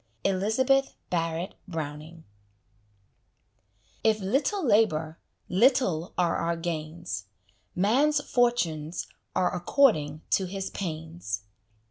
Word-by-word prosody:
Elizabeth 240 +8 +2 0.2
Barrett 165 +1 -1
Browning 160 -1 -6 1.8
If 220 -1 +3
little 275 - 0
labour, 165 - +2 0.3
little 190 - +2
are 175 -1 +2
our 170 0 -1
gains; 165 - -4 0.5
Man's 270 +11 +3
fortunes 180 - 0 0.3
are 180 0 +2
according 170 - +2
to 190 - +3
his 195 +1 -4
pains. 160 - -4
180 Hz, 85 wpm, -27 LUFS, 160-225 Hz, 1.8 s, If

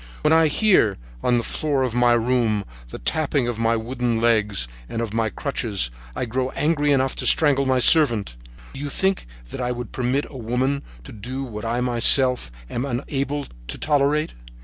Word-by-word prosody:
When 150 - +4
I 160 0 +5
hear, 155 - +3 0.2
on 120 -1 +2
the 120 - 0
floor 145 -1 -1
of 125 -3 -1
my 120 0 +4
room, 115 -3 +1 0.2
the - - -7
tapping 140 - 0
of 120 -2 -3
my 115 0 +2
wooden 120 0 -1
legs 105 - +2 0.2
and 115 - -4
of 115 -2 -3
my 115 -1 +1
crutches, 105 - -2 0.2
I - - -2
grow 130 +2 -2
angry 150 -1 +1
enough 135 -1 +1
to - - -1
strangle 140 -3 +3
my 130 -1 +3
servant. 120 - +3 0.4
Do 135 - -8
you 145 0 -4
think 190 - 0 0.2
that - - -5
I 125 0 -1
would 125 -2 -5
permit 130 +3 -1
a 135 - -9
woman 130 +4 -1 0.2
to - - -11
do 125 +6 -6
what 110 -4 -7
I 120 +2 -1
myself 125 - +3 0.2
am 120 - -3
unable 140 +2 -2 0.2
to - - -4
tolerate? 150 +1 +1
125 Hz, 185 wpm, -22 LUFS, 115-140 Hz, 0.4 s, I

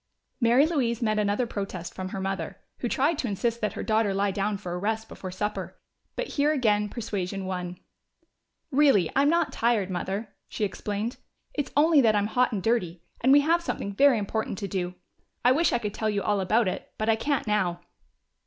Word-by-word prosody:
Mary 240 +3 +5
Louise 255 -8 0
met 215 -1 +1
another 210 +4 +1
protest 195 -6 -5
from 185 0 -5
her 195 - -5
mother, 190 -4 -3 0.2
who 240 - -2
tried 285 +6 +1
to 255 - -1
insist 230 +3 -1
that 210 - -1
her - - -5
daughter 215 -2 +1
lie 200 0 +1
down 200 +1 -1
for 185 -3 -7
a - - -2
little 180 - -4
rest 220 +2 -1
before 185 - -8
supper. 210 +3 -4 0.4
But - - -2
here 290 +1 +2
again 210 -7 +2
persuasion 195 -4 -4
won. 180 -1 -4 0.9
"Really, 265 - +4
I'm 280 +1 +4
not 340 +2 +1
tired, 225 -5 +1
Mother," 195 +4 -3 0.2
she - - -3
explained. 210 +4 -3 0.4
"It's 290 -3 -2
only 305 0 +6
that 220 -4 +4
I'm 205 0 +2
hot 250 +4 +2
and 200 -5 -3
dirty. 180 -7 0 0.2
And 260 - +5
we 285 +1 +8
have 335 +4 +2
something 200 -11 -3
very 275 +3 +5
important 210 0 -2
to 200 - -4
do 180 -2 -3 0.5
I 250 - +7
wish 315 +5 +3
I - - +2
could 210 -3 -4
tell 220 0 -1
you 200 -2 -1
all 205 +1 +1
about 215 +4 +2
it, 185 - -4
but 215 - -2
I 225 - +4
can't 280 +4 -1
now." 190 -5 0
215 Hz, 205 wpm, -27 LUFS, 195-245 Hz, 0.9 s, we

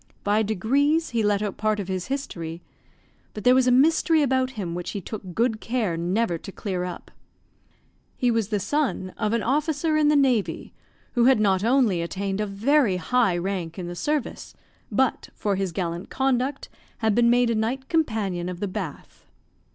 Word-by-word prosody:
By 205 +1 +2
degrees 275 - +1
he 230 -1 +1
let 205 -1 +1
out 205 -2 -3
part 215 0 0
of 195 - -4
his 185 -2 -3
history; 175 -12 -5 0.7
but 210 - -6
there 250 - +6
was 255 0 +4
a - - +5
mystery 315 +4 +4
about 260 -1 +1
him 180 -5 -3
which 175 0 -4
he - - -2
took 190 -2 -8
good 225 -1 +1
care 225 -8 -1
never 175 +2 0
to 195 - -9
clear 185 -2 -3
up. 180 -1 -7 1.1
He 245 -1 +2
was 225 -3 0
the 210 -1 -1
son 250 -6 -1
of 215 -1 -1
an 230 -2 0
officer 305 - +1
in 305 -1 +3
the 300 - +4
navy, 255 -7 +1 0.4
who 240 -2 +3
had 260 -3 +5
not 195 -2 +2
only 230 -7 +3
attained 195 +3 -3
a 210 - -1
very 220 +1 +2
high 195 0 +1
rank 175 -2 -3
in 180 - -4
the 175 0 -6
service, 295 - -3 0.4
but, - - 0
for 205 -2 -1
his 190 -2 -2
gallant 170 +1 -4
conduct, 265 +1 0 0.3
had 220 -2 +1
been 235 +2 +4
made 240 0 +3
a - - 0
Knight 245 +5 -2
Companion 215 - -1
of 180 -1 -6
the 205 - -2
Bath. 185 -6 -7
215 Hz, 185 wpm, -24 LUFS, 190-260 Hz, 1.1 s, there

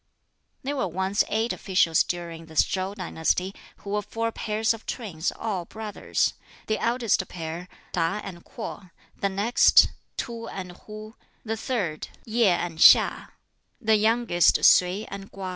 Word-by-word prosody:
There 280 +2 -3
were 255 - 0
once 190 +3 0
eight 220 +2 0
officials 175 -4 +2
during 170 -2 -6
this 160 -2 +3
Chow 190 +1 -3
dynasty, 185 0 -1 0.2
who 200 - -9
were 210 0 0
four 230 +3 -3
pairs 220 +1 0
of 225 - -12
twins, 185 -9 -3
all 195 -6 -3
brothers 215 +1 -2 0.3
the 215 - -1
eldest 230 -5 +1
pair 165 +1 -6 0.2
Tab 175 +4 -1
and 175 -3 -9
Kwoh, 205 -4 -8 0.3
the 200 - -1
next 205 +5 +5 0.3
Tub 230 -1 -5
and 185 -2 -6
Hwuh, 215 +4 -11 0.3
the 225 0 -2
third 205 -10 -3 0.2
Yť 230 +1 +2
and 175 -2 0
HiŠ, - - +6 0.5
the 220 -3 +3
youngest 220 -5 +3
Sui 185 +4 +5
and 195 0 -9
Kwa. 190 -1 -6
200 Hz, 145 wpm, -25 LUFS, 180-220 Hz, 0.5 s, HiŠ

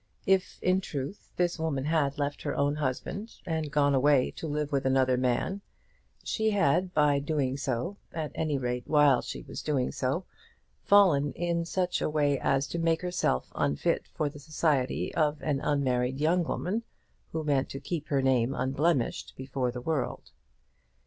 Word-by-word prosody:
If, 190 -1 +2
in 185 +1 +3
truth, 145 +4 -6
this 175 -1 0
woman 145 -4 -1
had 150 -3 +1
left 145 0 -2
her 145 - -2
own 145 +1 +1
husband 155 - -3
and 160 -3 -2
gone 145 -1 +3
away 135 -1 +4
to 160 - -6
live 150 0 -2
with 140 -2 +1
another 130 -1 +3
man, 130 +10 0 0.6
she 220 -1 0
had 185 -3 +2
by 150 -3 +3
doing 140 -3 -1
so, 140 +7 -2
at 155 -2 -4
any 155 -3 -1
rate 125 -1 -3
while 145 -4 +5
she - - -6
was - - -7
doing 140 -4 0
so, - - -1 0.6
fallen 170 -9 +4
in 170 0 -1
such 180 +1 -1
a - - +1
way 145 -3 +1
as 135 0 +1
to 170 - -3
make 165 +1 +1
herself 175 - 0
unfit 70 - 0
for 155 - -2
the 145 0 -7
society 145 -3 0
of 155 -2 +1
an 145 -3 0
unmarried 130 -3 0
young 170 +4 +3
woman 200 +7 -2 0.5
who 160 -1 -2
meant 140 -3 +1
to 135 - -6
keep 150 +2 -4
her 140 -2 +1
name 130 0 +2
unblemished 135 +1 0
before 130 -1 -2
the 125 0 -6
world. 145 -2 -3
145 Hz, 170 wpm, -29 LUFS, 135-165 Hz, 0.6 s, while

